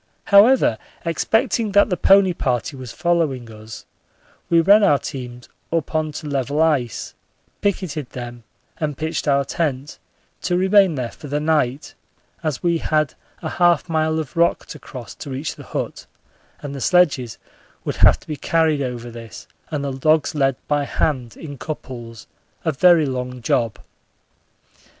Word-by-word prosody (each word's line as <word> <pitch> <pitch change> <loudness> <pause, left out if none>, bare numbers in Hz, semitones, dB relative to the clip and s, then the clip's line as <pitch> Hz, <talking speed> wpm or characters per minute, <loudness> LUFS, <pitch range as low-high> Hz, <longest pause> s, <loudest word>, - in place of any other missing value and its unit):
However, 200 - +5 0.3
expecting 220 - +1
that 205 0 +4
the - - +3
pony 190 +1 +5
party 130 -2 -1
was 130 -3 -8
following 150 -9 0
us, 110 +1 -11 0.6
we 170 - +5
ran 200 +5 +6
our 145 -7 +5
teams 125 -4 -7 0.2
up 165 -2 -1
on 155 -1 0
to 150 - -6
level 140 +1 -1
ice, 145 -7 0 0.5
picketed 165 -9 -2
them, 120 -1 -8 0.4
and 150 -3 -2
pitched 160 0 -3
our 140 -1 +3
tent, 145 -2 -3 0.4
to 175 -1 0
remain 190 -2 +4
there 125 -3 -3
for 150 - -11
the 145 +1 -1
night, 150 -3 0 0.5
as 155 -5 -3
we 170 -1 +2
had 155 -3 0 0.3
a - - -2
half 175 -1 +4
mile 160 -1 +1
of 155 -4 -5
rock 170 0 +2
to - - -8
cross 125 -4 -9
to - - -9
reach 135 +3 -3
the - - -12
hut - - -5 0.6
and 140 -1 -5
the 140 - -6
sledges 140 - +2 0.5
would - - -3
have - - +6
to - - -20
be 155 - -3
carried 160 0 +1
over 120 -2 -4
this 115 -1 -10 0.2
and 145 -2 -3
the 140 - -2
dogs 155 +4 +2
led 135 -3 +2
by 145 -1 +1
hand 130 -4 -2
in 145 -4 -9
couples 120 -7 -7 0.4
a 160 - +2
very 165 +2 +5
long 125 -1 -4
job. 115 -1 0
150 Hz, 160 wpm, -21 LUFS, 130-165 Hz, 0.6 s, ran